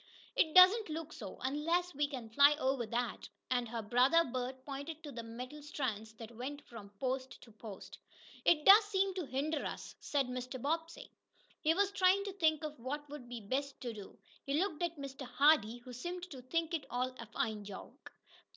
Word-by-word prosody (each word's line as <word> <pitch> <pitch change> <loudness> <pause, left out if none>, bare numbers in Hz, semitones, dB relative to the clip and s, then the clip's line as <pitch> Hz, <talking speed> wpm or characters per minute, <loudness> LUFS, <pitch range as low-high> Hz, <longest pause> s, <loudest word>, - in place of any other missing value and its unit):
"It 315 -1 +2
doesn't 375 +3 +8
look 315 0 -5
so 200 -5 -8
unless 330 +7 0
we 290 +1 +1
can 250 -6 -7
fly 285 +5 +7
over 265 -5 0
that," 235 -1 -2 0.2
and 245 -2 +1
her 230 -1 -4
brother 255 +10 +5
Bert 255 -1 -4
pointed 290 +3 -6
to 295 - -7
the 235 - -5
metal 250 +6 -8
strands 225 -7 -3
that 225 +1 -10
went 285 +5 -6
from 215 -4 -10
post 260 -1 -2
to 230 - -15
post. 215 -2 -10 0.4
"It 300 -3 +4
does 410 +3 +10
seem 390 -2 +1
to 360 -5 -4
hinder 285 +4 -1
us," - - -5
said 285 -2 0
Mr. 250 +1 -5
Bobbsey. 325 +5 -3 0.5
He 320 +1 +3
was 400 +1 +2
trying 385 0 +4
to 400 -1 -5
think 315 -5 +2
of 300 -3 -5
what 290 +5 -4
would 270 -5 -8
be 240 -2 -6
best 270 +6 -3
to 240 -2 -4
do. 205 -3 -10 0.3
He 275 - -1
looked 365 -3 -1
at 340 -2 -1
Mr. 275 0 -7
Hardee, 250 -3 +4
who 245 +1 -11
seemed 350 +8 -5
to 265 -3 -8
think 330 +6 -1
it 320 -4 -2
all 255 +1 -1
a 230 - -7
fine 220 -2 -2
joke. 200 -1 -10
275 Hz, 195 wpm, -34 LUFS, 245-320 Hz, 0.5 s, does